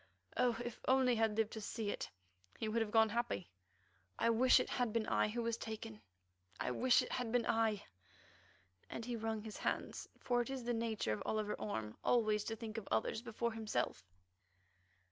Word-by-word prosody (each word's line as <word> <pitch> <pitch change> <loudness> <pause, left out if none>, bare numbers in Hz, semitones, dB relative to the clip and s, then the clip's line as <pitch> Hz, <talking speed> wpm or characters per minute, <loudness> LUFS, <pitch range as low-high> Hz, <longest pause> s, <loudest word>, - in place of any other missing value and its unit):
Oh! 245 -2 +3
if 240 - -5
only 260 -1 +5
he - - 0
had 220 -1 +2
lived 225 -1 +2
to 220 - -5
see 210 0 -2
it, - - -4 0.5
he 220 - -2
would 225 +2 +1
have 220 - 0
gone 220 0 +5
happy. 235 -5 -2 0.7
I 230 - +3
wish 250 +3 +6
it - - 0
had 245 -3 0
been 225 0 +1
I - - +2
who 235 +2 -2
was 230 0 0
taken; 210 - -6 0.6
I - - 0
wish 250 - +4
it - - -7
had 245 -3 -1
been 245 -1 +2
I!" 225 -2 +2 1.1
and 230 - -5
he 245 -1 -2
wrung 220 -1 -2
his 220 -1 -7
hands, - - -2
for 245 -1 +2
it 240 - -4
is 265 -2 -3
the 240 +1 0
nature 225 - 0
of 105 - -4
Oliver 215 -1 0
Orme 110 - -3
always 215 -3 +3
to 225 - -2
think 225 0 -5
of 210 - -13
others 110 - +1
before 235 0 -2
himself. 215 - -1
225 Hz, 195 wpm, -37 LUFS, 215-235 Hz, 1.1 s, wish